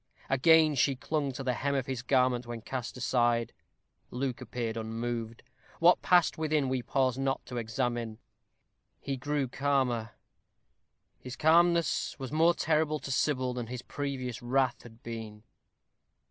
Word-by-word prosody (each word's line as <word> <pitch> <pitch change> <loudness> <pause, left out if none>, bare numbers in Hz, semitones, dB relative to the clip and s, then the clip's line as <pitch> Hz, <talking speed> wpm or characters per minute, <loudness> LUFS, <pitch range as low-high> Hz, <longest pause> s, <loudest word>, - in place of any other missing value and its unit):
Again 155 +3 +5
she 135 0 +2
clung 145 +1 -2
to 135 - -6
the 130 -1 0
hem 140 +4 -1
of 135 -2 0
his 130 -3 -4
garment 125 -2 +2
when 120 -1 -6
cast 125 +1 -5
aside. 120 -2 +1 0.6
Luke 125 0 -3
appeared 120 -2 -4
unmoved; 115 0 -4 0.4
what 175 +2 +5
passed 175 -2 +3
within 155 -4 +1
we 130 -1 0
pause 130 +1 0
not 135 0 -1
to 125 - -6
examine. 120 -1 -2 0.8
He 140 - -3
grew 145 +1 -1
calmer; 130 -4 0 1.1
his 125 0 -8
calmness 170 +2 +3
was 135 -2 -6
more 165 +3 +4
terrible 155 -1 +1
to 140 - -7
Sybil 130 -2 +1
than 120 -2 -4
his 125 +1 -6
previous 130 -4 -4
wrath 130 0 +1
had 115 -1 -15
been. 110 -2 -7
130 Hz, 145 wpm, -30 LUFS, 120-145 Hz, 1.1 s, Again